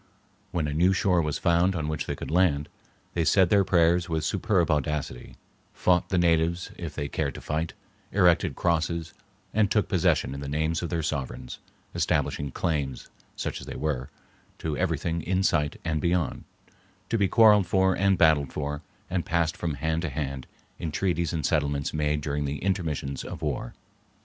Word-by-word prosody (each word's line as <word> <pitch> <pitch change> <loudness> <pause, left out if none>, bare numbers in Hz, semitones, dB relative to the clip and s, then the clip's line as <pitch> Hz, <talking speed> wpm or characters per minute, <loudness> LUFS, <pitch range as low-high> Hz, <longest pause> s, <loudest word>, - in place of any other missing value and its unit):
When 80 -3 -1
a 75 - -2
new 90 +5 +4
shore 90 -2 +2
was 75 -2 -1
found 85 +2 +2
on 80 -3 -2
which 75 -1 -3
they - - -2
could - - -6
land, 80 -5 +2 0.4
they 85 - +1
said 95 +1 +4
their 100 -1 +5
prayers 85 -1 +3
with 80 -1 -1
superb 95 -4 +1
audacity, 75 -4 -2 0.4
fought 90 -1 +2
the 95 - +1
natives 85 0 +2
if 85 -2 -6
they 75 -2 -2
cared - - -2
to - - -6
fight, 80 +2 -2 0.4
erected 90 -5 +3
crosses, 85 -1 0 0.4
and 105 -1 +3
took 105 0 +2
possession 90 -7 +1
in 70 - -6
the 70 - -6
names 80 +2 0
of 85 - -3
their 85 -2 -1
sovereigns, 70 -4 -4 0.3
establishing 70 -1 0
claims, 70 -4 -2 0.3
such - - -4
as - - -10
they - - -6
were, 70 -5 -2 0.5
to 80 -2 -3
everything 85 +2 -1
in 95 +4 0
sight 75 -4 +1
and 80 -2 0
beyond, 85 -4 0 0.6
to 115 - +1
be 100 - +3
quarreled 105 -3 +6
for 95 0 +3
and 100 0 +2
battled 80 -4 +4
for, 75 0 -3 0.3
and 90 -2 -1
passed 85 -1 0
from 80 -4 -3
hand 80 +2 -1
to 85 - -2
hand 70 -2 -4 0.3
in 80 - -3
treaties 85 -1 0
and 80 -4 -2
settlements 70 -2 0
made 75 -1 0
during 75 0 -2
the 70 +1 -2
intermissions 80 -8 -2
of - - -7
war. - - -3
80 Hz, 180 wpm, -27 LUFS, 75-90 Hz, 0.6 s, quarreled